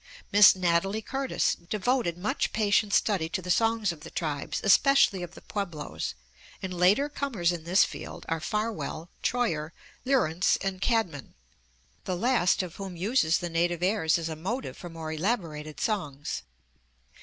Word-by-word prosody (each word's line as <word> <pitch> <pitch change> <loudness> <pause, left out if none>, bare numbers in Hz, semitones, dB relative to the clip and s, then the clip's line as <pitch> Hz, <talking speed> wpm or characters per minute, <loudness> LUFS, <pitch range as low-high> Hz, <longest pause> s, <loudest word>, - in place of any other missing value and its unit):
Miss 205 -1 +8
Natalie 185 +4 +1
Curtis 270 +2 0 0.2
devoted 215 -4 0
much 195 +4 -1
patient 210 -1 +2
study 190 -6 +2
to - - -2
the 180 0 -3
songs 225 -1 +2
of 165 - -9
the - - -10
tribes, 150 -4 -3
especially 215 -2 +5
of 175 -1 -7
the - - -12
Pueblos, 165 - -4 0.4
and 190 -1 -5
later 185 +11 +3
comers 250 -12 -1
in 170 -2 -6
this 185 +3 +5
field - - -6
are 165 0 -1
Farwell, 210 -3 -3
Troyer, 165 -11 -1 0.3
Lieurance, 195 - +2
and 195 -1 -3
Cadman, 205 - -1 0.7
the 185 -1 -2
last 215 -4 +2
of 175 -2 -8
whom 195 -2 -6
uses 175 -2 +2
the 175 - -4
native 170 +1 0
airs 185 -4 +2
as 165 -1 -3
a 160 - -4
motive 225 +12 -4
for 175 - -9
more 165 -1 -6
elaborated 160 -4 -2
songs. 150 - -2
185 Hz, 155 wpm, -28 LUFS, 165-215 Hz, 0.7 s, Miss